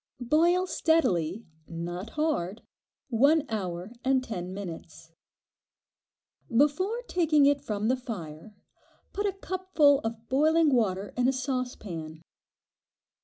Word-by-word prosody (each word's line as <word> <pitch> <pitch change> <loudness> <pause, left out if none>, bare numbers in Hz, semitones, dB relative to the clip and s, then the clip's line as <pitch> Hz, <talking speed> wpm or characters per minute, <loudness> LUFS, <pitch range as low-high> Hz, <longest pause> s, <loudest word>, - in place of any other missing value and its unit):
Boil 335 +8 +3
steadily, 225 - +1 0.2
not 175 +4 -5
hard, 230 - -1 0.5
one 280 +6 +4
hour 185 -3 -4
and 265 -1 +2
ten 185 -7 -5
minutes. 170 -4 -8 1.4
Before 335 - +1
taking 320 - +3
it 285 0 +3
from 210 0 -2
the 255 - +3
fire, 210 -6 -8 0.6
put 410 +1 -1
a - - +1
cupful 370 -7 +2
of 225 -1 -6
boiling 310 +2 +3
water 200 -5 0
in 250 0 +2
a - - +4
saucepan. 245 - -4
250 Hz, 110 wpm, -28 LUFS, 190-305 Hz, 1.4 s, one